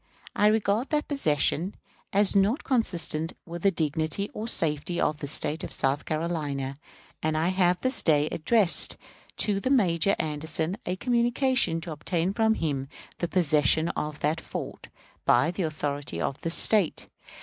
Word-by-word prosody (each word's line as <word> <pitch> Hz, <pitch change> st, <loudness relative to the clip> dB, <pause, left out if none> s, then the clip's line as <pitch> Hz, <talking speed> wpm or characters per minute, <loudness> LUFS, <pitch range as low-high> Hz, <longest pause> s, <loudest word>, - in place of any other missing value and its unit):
I 210 Hz, -, +4 dB
regard 215 Hz, +3 st, +1 dB
that 300 Hz, -1 st, -1 dB
possession 175 Hz, -, 0 dB, 0.4 s
as 205 Hz, 0 st, +3 dB
not 200 Hz, +7 st, +2 dB
consistent 175 Hz, -, +1 dB
with 170 Hz, 0 st, -7 dB
the 195 Hz, -, +4 dB
dignity 160 Hz, +3 st, -2 dB
or 215 Hz, +2 st, -5 dB
safety 160 Hz, -3 st, +1 dB
of 150 Hz, -, 0 dB
the 145 Hz, -, -5 dB
State 150 Hz, +2 st, 0 dB
of -, -, -6 dB
South 135 Hz, +2 st, 0 dB
Carolina; 150 Hz, -4 st, -3 dB, 0.4 s
and 155 Hz, 0 st, 0 dB
I 165 Hz, +3 st, +1 dB
have 180 Hz, -1 st, +2 dB
this 260 Hz, +1 st, +1 dB
day 150 Hz, -2 st, +3 dB
addressed 190 Hz, +3 st, +2 dB, 0.4 s
to 200 Hz, -2 st, +1 dB
Major 195 Hz, -, +3 dB
Anderson 160 Hz, +4 st, -2 dB
a 180 Hz, -, -1 dB
communication 240 Hz, -4 st, +1 dB
to 165 Hz, -, -6 dB
obtain 170 Hz, +4 st, -2 dB
from 220 Hz, 0 st, +2 dB
him 140 Hz, -6 st, -3 dB, 0.3 s
the 175 Hz, -, -1 dB
possession 160 Hz, -2 st, +2 dB
of 150 Hz, -2 st, -4 dB
that 155 Hz, +3 st, 0 dB
fort, -, -, -7 dB, 0.4 s
by 165 Hz, -, +3 dB
the 180 Hz, -, -4 dB
authorities 145 Hz, -3 st, -3 dB
of 140 Hz, -, -3 dB
this 165 Hz, 0 st, -1 dB
State. 210 Hz, -7 st, +3 dB
170 Hz, 150 wpm, -26 LUFS, 155-200 Hz, 0.4 s, I